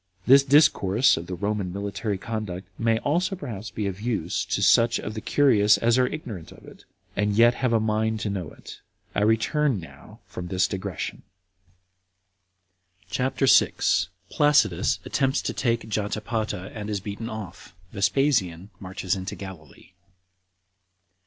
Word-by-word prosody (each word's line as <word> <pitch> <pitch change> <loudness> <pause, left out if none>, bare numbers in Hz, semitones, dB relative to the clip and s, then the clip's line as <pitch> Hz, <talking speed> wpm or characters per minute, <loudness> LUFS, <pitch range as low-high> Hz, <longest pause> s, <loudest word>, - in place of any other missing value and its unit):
This 135 +2 +7
discourse 135 -6 +4
of 85 +1 -6
the 90 - -4
Roman 100 0 -2
military 100 +1 -3
conduct 95 -3 -5
may 115 0 +2
also 175 - 0
perhaps 115 - -7
be 105 - -4
of 100 0 -4
use 110 -8 -2
to - - -1
such 115 0 +4
of 105 - -5
the 110 - -5
curious 105 -8 +4
as 115 +2 +2
are 125 - +3
ignorant 115 - -7
of - - -15
it, - - -15 0.3
and 105 0 0
yet 120 +2 +6
have 130 -1 -1
a 115 - +3
mind 110 0 0
to 105 - -2
know 90 -6 -4
it. - - -12 0.3
I - - 0
return 110 +4 +2
now 85 - -13
from 90 - -7
this 95 0 +1
digression. 95 -3 -5 1.9
CHAPTER 130 +5 0
6. - - +3 0.2
Placidus 150 0 +3
Attempts 135 -1 0
To - - -2
Take 115 -3 -1
Jotapata 105 -2 -3
And 105 -1 -6
Is 105 -2 -1
Beaten 105 +4 -6
Off. 100 -4 -9 0.2
Vespasian 100 - 0
Marches 95 -1 -3
Into 95 0 -5
Galilee. 95 -6 -11
105 Hz, 145 wpm, -25 LUFS, 95-120 Hz, 1.9 s, This